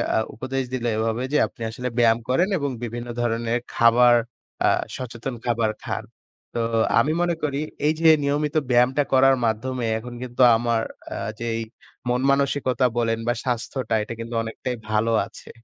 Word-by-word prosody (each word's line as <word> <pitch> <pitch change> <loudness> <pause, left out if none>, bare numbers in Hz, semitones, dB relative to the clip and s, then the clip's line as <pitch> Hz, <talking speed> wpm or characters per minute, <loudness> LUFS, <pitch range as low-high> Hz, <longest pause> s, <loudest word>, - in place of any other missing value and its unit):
আ - - +3 0.2
উপদেশ 130 +3 -2
দিলো 120 -2 -1
এভাবে 115 +2 -1
যে, - - +4
"আপনি 120 - -19
আসলে 125 +3 -4
ব্যায়াম 115 -1 +4
করেন 170 +9 +3
এবং 140 -3 -2
বিভিন্ন 120 +1 -5
ধরনের 115 0 0
খাবার 120 +1 +6 0.5
আ - - +5 0.3
সচেতন 125 0 -5
খাবার 115 -2 +1
খান।" - - -3 0.5
তো - - -2 0.4
আমি 145 +6 +2
মনে 175 -1 +1
করি 140 -2 -1 0.3
এই 155 - +4
যে 165 -1 +6
নিয়মিত 145 +1 0
ব্যায়ামটা 125 +3 +4
করার 135 0 +6
মাধ্যমে 120 +3 -1
এখন 120 +2 -8
কিন্তু 125 0 -3 0.2
আমার 115 -1 0 0.3
আ - - -5 0.2
যেই 115 -1 -2 0.5
মন 125 +1 +1
মানসিকতা 140 -2 +1
বলেন 115 -1 +1
বা 120 - +3
স্বাস্থ্যটা 120 -1 -2
এটা 110 - -6
কিন্তু 115 +1 -6
অনেকটাই 115 +2 -4
ভালো 110 +1 +1
আছে। - - -13
120 Hz, 160 wpm, -23 LUFS, 115-130 Hz, 0.5 s, খাবার